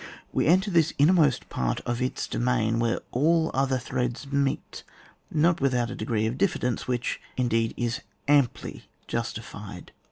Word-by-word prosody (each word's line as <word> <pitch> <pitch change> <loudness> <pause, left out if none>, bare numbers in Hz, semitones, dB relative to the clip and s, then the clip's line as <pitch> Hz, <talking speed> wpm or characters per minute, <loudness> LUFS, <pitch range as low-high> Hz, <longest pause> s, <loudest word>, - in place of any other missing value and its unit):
We - - +1
enter 190 +5 +4
this 165 -2 +3
innermost 150 -3 +4
part - - -1
of. 120 +1 -3
its 125 - -1
do - - -4
main, 115 -2 +1
where 115 0 0
all 160 +5 +2
other 135 0 +1
threads 125 0 -3
meet, 140 -1 -1 0.5
not 160 +1 +2
without 125 -3 +1
a - - -5
degree 110 0 -1
of 120 +4 -2
diffidence, 125 -10 0
which, 125 0 -2 0.2
in 125 -1 +1
deed, 115 0 +1
is 120 0 -1 0.3
amply 140 -4 +1 0.2
justified. 105 -4 -5
125 Hz, 155 wpm, -26 LUFS, 115-145 Hz, 0.5 s, enter